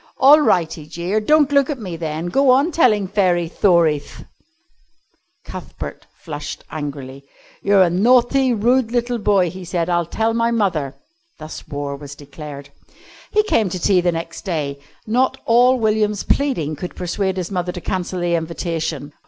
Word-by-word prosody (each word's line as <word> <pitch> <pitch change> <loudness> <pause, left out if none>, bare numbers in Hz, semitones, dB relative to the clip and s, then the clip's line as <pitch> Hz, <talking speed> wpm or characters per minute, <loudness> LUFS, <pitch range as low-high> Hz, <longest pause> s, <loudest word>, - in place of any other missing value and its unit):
"All 285 +3 +7
right," 175 - +2
he 150 -2 -10
jeered, 175 +7 -2
"don't 300 -2 +4
look 280 -1 +3
at 295 - -2
me 190 -7 -6
then. 160 0 -4
Go 270 +7 +3
on 275 +7 +4
tellin' 215 - +3
fairy 180 -4 +1
thorieth." 165 -5 +1 1.2
Cuthbert - - -8
flushed 150 -2 -7
angrily. 140 -2 -6 0.4
"You're 200 -1 +4
a 175 - +2
nathty 250 +6 +3
rude 240 +2 +2
little 240 0 -1
boy," 195 -5 +2
he 185 0 -9
said. 175 0 -2
"I'll 175 -1 +1
tell 225 +5 0
my 230 0 +1
mother." 180 - -1 0.4
Thus 155 -1 -9
war 145 -1 -4
was 140 0 -10
declared. 145 0 -10 0.6
He 425 - +2
came 225 - +1
to 185 - -4
tea 185 +1 +3
the 175 0 +1
next 165 0 -6
day. 150 -7 -3 0.3
Not 260 +4 +1
all 245 +3 +4
William's 215 -2 0
pleading 170 - 0
could 175 +4 -7
persuade 190 +1 -2
his 180 +1 -4
mother 180 -1 -2
to 180 - -7
cancel 185 +1 -3
the 175 0 0
invitation. 160 -3 -3
180 Hz, 160 wpm, -20 LUFS, 160-230 Hz, 1.2 s, All